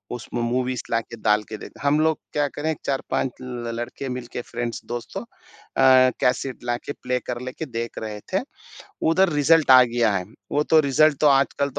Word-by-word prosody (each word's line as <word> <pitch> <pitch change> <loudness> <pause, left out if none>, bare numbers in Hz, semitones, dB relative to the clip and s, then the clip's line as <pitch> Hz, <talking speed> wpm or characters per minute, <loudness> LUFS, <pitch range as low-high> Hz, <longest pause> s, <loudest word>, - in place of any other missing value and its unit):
उसमें 120 +1 -5
मूवीज़ 125 +1 -1
लाके 115 0 -2
डाल 105 0 +3
के 110 - -5
देखते, - - -12
हम 145 +2 +3
लोग 160 0 +2 0.2
क्या 145 -1 +1
करें 150 +3 -2
4-5 135 -1 -1
ल 120 -2 -5
लड़के 120 +3 -5
मिलकर 125 -1 -5
फ्रेंड्स 120 0 -3
दोस्तों 120 0 -5
अ, 130 -1 +2
कैसेट 130 +1 -1
लाके 120 +3 -3
प्ले 125 0 0
कर 120 -1 -3
लेके 130 +5 -5
देख 115 -4 -5
रहे 105 -1 -6
थे। 190 - +3 0.7
उधर 190 +3 +4
रिजल्ट 150 +1 +4
आ 130 -1 +10
गया 120 -2 +1
है। 90 - -2 0.3
वो 145 - +2
तो 160 - +8
रिजल्ट 150 +1 +4
तो 150 - +4
आजकल 140 +1 +2
125 Hz, 180 wpm, -23 LUFS, 120-140 Hz, 0.7 s, आ